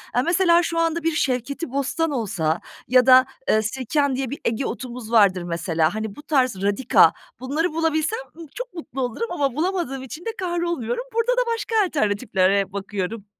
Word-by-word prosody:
Eee, 245 - +4
mesela, 345 +1 +3
şu 330 0 -1
anda 330 0 0
bir 330 - +2
şevketibostan 280 +3 -1
olsa 180 - -1 0.3
ya 255 0 +5
da, 255 0 +7 0.2
eee, 215 - +4
sirken 265 +4 -1
diye 265 -1 -2
bir 280 - -6
Ege 230 +4 0
otumuz 245 -3 -6
vardır, 195 -5 +4
mesela, 170 +1 0
hani, 220 -2 -4
bu - - -10
tarz 255 -11 +1
radika, 205 +5 +4 0.3
bunları 300 +6 -1
bulabilsem, 325 +6 0 0.2
ımm, 330 - -9
çok - - -6
mutlu 290 -6 -6
olurum 255 - -3
ama 275 -6 -1
bulamadığım 325 -6 -2
için 305 +7 -9
de - - -1
kahrolmuyorum. 345 - -2
Burada 460 +2 +1
da - - +4
başka 450 0 -3
alternatiflere 200 - +1
bakıyorum. 200 +1 -4
265 Hz, 165 wpm, -23 LUFS, 220-330 Hz, 0.3 s, da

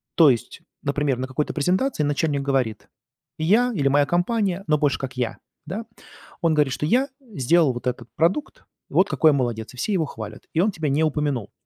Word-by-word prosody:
То 160 -4 +7
есть, 120 -4 -2 0.2
например, 140 -2 0
на 130 +1 -3
какой-то 140 +3 -2
презентации 180 - +1
начальник 145 0 0
говорит: 130 -6 -1 0.5
"Я" 215 +10 +3
или 145 -9 +1
"Моя 145 +1 +4
компания", 185 +3 0
но 155 -1 +3
больше 145 -2 +1
как 130 -1 -6
"Я", 120 -3 -2 0.3
да. 200 +8 -5 0.6
Он 165 -2 +3
говорит, 145 -4 +2
что: 150 - -2
"Я 250 - +3
сделал 170 - +2
вот 120 - -7
этот 125 - -3
продукт, 180 - 0 0.2
и - - -15
вот - - +4
какой 155 - +4
я - - +1
молодец", 120 -5 -2
и - - -14
все 205 - -1
его 170 -5 +1
хвалят, 110 -6 -8
и 160 - +1
он 210 +4 +2
тебя 160 -5 -2
не 145 +3 +2
упомянул. 145 -8 -1
150 Hz, 200 wpm, -23 LUFS, 135-175 Hz, 0.6 s, То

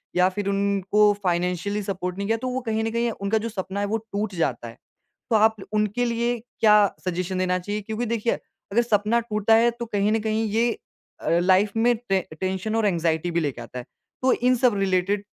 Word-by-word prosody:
या 180 +1 +5
फिर 200 +1 -4
उनको 200 +1 +2
फ़ाइनेंशियली 180 +3 0
सपोर्ट 180 -1 -4
नहीं 200 0 -3
किया, 225 0 +1
तो 255 - -4
वो 255 +1 -2
कहीं 220 -1 -1
न 225 - -1
कहीं 235 0 0
उनका 200 +1 -1
जो 230 +2 -3
सपना 195 -1 -4
है, 205 - 0
वो 220 +2 0
टूट 210 -2 -4
जाता 125 -8 -1
है। 115 - -11 0.5
तो 225 - +2
आप 220 +1 +4 0.2
उनके 215 +3 +1
लिए 235 0 0 0.2
क्या 210 -1 +6 0.3
सजेशन 185 +1 -2
देना 180 0 +1
चाहिए? 205 +3 -4
क्योंकि 220 +3 -3
देखिए, 230 0 0 0.4
अगर 235 +4 +3
सपना 220 0 +2
टूटा 225 -1 +2
है 235 +1 +5
तो 235 0 -6
कहीं 205 -1 0
न 225 - +2
कहीं 220 +1 0
ये 230 +2 +2 0.5
अ, - - -1
लाइफ़ 190 +3 +3
में 240 +1 +3
टें 190 -1 +3 0.2
टेंशन 190 +3 -2
और 225 -1 +1
एंज़ाइटी 170 -1 0
भी 170 - +1
लेके 140 -6 -3
आता 125 +2 -8
है। 120 - -8 0.4
तो 260 0 +3
इन 250 +1 +2
सब 235 -4 +3
रिलेटिड 195 +1 +1
210 Hz, 210 wpm, -24 LUFS, 185-225 Hz, 0.5 s, क्या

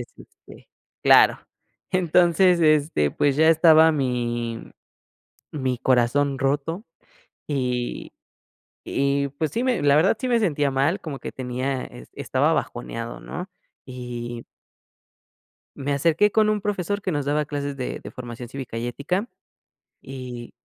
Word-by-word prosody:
entonces, - - -6
este - - -17 0.4
claro, - - +6 0.5
entonces, 180 0 +3
este, 150 - +3
pues 145 -1 +1
ya 160 +1 +5
estaba 160 0 +6
mi 120 -4 -2 0.8
mi 130 -4 -2
corazón 135 +3 +2
roto 145 - -1 0.6
y 125 -4 -2 0.8
y 140 0 0
pues 140 +2 -3
sí, 235 +8 -1
me 255 -3 +1
la 145 -1 +4
verdad 180 +8 +3
sí 255 - -2
me 240 -2 +3
sentía 145 -8 +1
mal, 140 +8 +1
como 145 -4 -7
que - - -6
tenía 130 +1 -3
e - - -12
estaba - - 0
bajoneado 115 - -4
¿no? 180 +2 -7 0.4
Y 120 -2 -7 1.3
me 140 0 -2
acerqué 165 +8 +3
con 215 0 +3
un 210 - 0
profesor 205 0 -2
que 185 - -2
nos 145 -2 -1
daba 150 +1 0
clases 145 -1 -4
de 130 -2 -4
de - - -9
formación 120 -1 -8
cívica 130 -2 -7
y 115 +1 -3
ética, 180 - -2 0.7
y 125 -3 -8
140 Hz, 135 wpm, -23 LUFS, 125-165 Hz, 1.3 s, claro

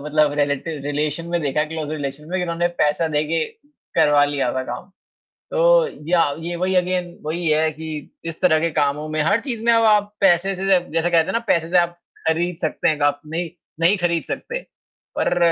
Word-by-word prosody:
मतलब 150 -1 +2
relative 145 +1 -1
relation 150 +3 -2
में 170 0 0
देखा, 150 +1 +1
क्लोज़ 155 -1 -5
रिलेशन 150 0 -5
में 185 - 0
कि - - -1
उन्होंने 170 0 0
पैसा 150 +2 +1
दे 150 -1 +1
के 165 -1 +1 0.5
करवा 145 -1 +5
लिया 145 -3 -1
था 130 - -1
काम। 125 +11 -7 0.6
तो - - +4 0.2
या 175 -1 +5 0.2
ये 170 +1 -4
वही 185 +2 0
अगेन 180 -1 0
वही 165 +2 -2
है 155 +1 +2
कि, 155 -1 -7
इस 165 -1 -6
तरह 165 -4 +4
के 165 +1 0
कामों 145 +2 0
में 155 0 0
हर 200 +8 +3
चीज़ 235 -4 -4
में 235 - +5
अब 230 0 +4
आप 210 -1 +3
पैसे 190 0 +3
से 190 +1 -4
जै 190 -2 +5
जैसे 165 +1 +1
कहते 165 -2 +4
हैं - - -3
ना 230 - +2
पैसे 165 -3 +2
से 180 - +3
आप, 175 0 +1 0.3
खरीद 170 +2 0
सकते 155 - 0
हैं, 155 -1 -1
ग - - 0
आप 145 0 +2
नहीं 165 +2 -3 0.3
नहीं 175 +5 +4
खरीद 170 -2 0
सकते। 480 +2 -4 0.6
पर 175 - +1
165 Hz, 215 wpm, -21 LUFS, 150-180 Hz, 0.6 s, करवा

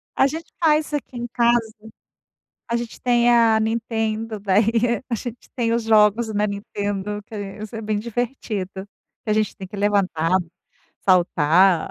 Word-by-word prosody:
A 270 - +4
gente 320 +4 -5 0.2
faz 305 -1 +3
aqui 265 -3 -4
em 240 - -3
casa, 240 0 +4 1.1
a 235 - -2
gente 235 -1 -6
tem 240 -1 +3
é 230 -2 +5
a - - +2
Nintendo, 220 -1 -2
daí 225 +4 +2
a 240 - -1
gente 240 +1 -7
tem 230 -2 0
os 235 -1 0
jogos, 220 0 +3
né, 210 +1 +2
Nintendo 205 0 -4
que 220 - -9 0.3
isso 215 +1 -7
é 225 - -4
bem 215 -1 -2
divertido, 230 -4 -3 0.6
que 215 - -3
a - - +4
gente 215 -1 0
tem 190 -1 -8
que 210 - -9
levantar, 195 -5 +1 0.7
saltar. 175 -1 +4
220 Hz, 160 wpm, -22 LUFS, 205-235 Hz, 1.1 s, é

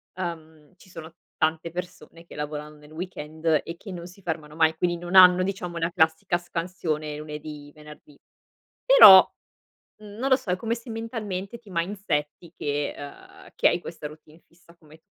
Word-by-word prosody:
uhm, 160 -3 -7
ci 185 - -20
sono 165 -2 -10 0.2
tante 160 +1 0
persone 170 -1 -9
che - - -14
lavorano 150 0 -6
nel 150 0 -18
weekend 160 -2 -2
e 170 - -8
che 195 - -10
non 175 -1 -7
si 185 +2 -17
fermano 155 -3 -5
mai, 160 0 +3
quindi 175 +1 -1
non 175 +1 -7
hanno, 185 -1 +8
diciamo, 180 -3 -4
la 165 +1 -1
classica 160 +1 +1
scansione 165 -3 -4
lunedì, 150 -1 -9
venerdì. 150 -1 -15 0.7
Però, - - +10 0.7
non 215 +5 -5
lo 260 - +6
so, 255 -9 -5
è 180 - 0
come 230 +4 -2
se 235 +1 -11
mentalmente 225 -2 -5
ti 220 -4 -19
mindsetti 170 -3 -3
che, 145 0 -2
uhm, 145 0 -12
che - - +4
hai - - -1
questa 150 - -8
routine 155 +2 -17
fissa, 170 0 -23
come 155 -1 -18
170 Hz, 165 wpm, -25 LUFS, 155-185 Hz, 0.7 s, Però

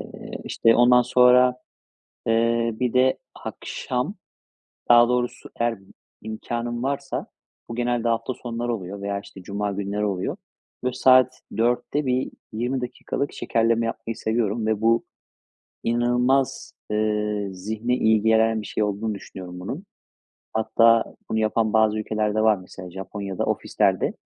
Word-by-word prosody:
Eee, - - -10
işte, 115 - +3
ondan 125 0 +6
sonra, 125 0 +5 0.7
eee, 115 +1 +2
bir 125 -1 0
de 130 +1 +4 0.2
akşam, 130 +10 -4 0.7
daha 120 0 +7
doğrusu 125 0 -2
eğer 115 -4 0
b - - -21 0.4
imkânım 120 +2 -4
varsa, 140 +1 -2 0.4
bu 115 - -5
genelde 120 -1 0
hafta 115 +2 -1
sonları 120 0 -3
oluyor 100 0 -6
veya, 100 0 -2
işte, 95 -1 -13
cuma 100 +2 -3
günleri 100 +1 -2
oluyor. 95 -3 -2 0.5
Böyle 125 0 -1
saat 130 0 +5 0.2
16:00'da 120 +5 0
bir 130 +1 0 0.2
20 125 +4 -1
dakikalık 130 +3 -3
şekerleme 115 0 +1
yapmayı 115 0 -4
seviyorum 110 -1 -1
ve 110 -1 0
bu 115 +1 +3 0.8
inanılmaz, 125 +3 +1 0.2
ııı, 105 -2 -1
zihne 110 +6 -2
iyi 110 -3 +3
gelen 110 0 +3
bir 105 - -8
şey - - -2
olduğunu 105 +1 -1
düşünüyorum, 90 -2 -9
bunun. 140 - -5 0.7
Hatta 115 +1 +4 0.3
bunu 110 - 0
yapan 110 0 +1
bazı 110 0 +3
ülkeler 105 -1 -1
de 110 - +1
var, 110 -1 +5
mesela 90 0 -10
Japonya'da 95 +1 -4
ofislerde - - +1
115 Hz, 135 wpm, -24 LUFS, 105-120 Hz, 0.8 s, daha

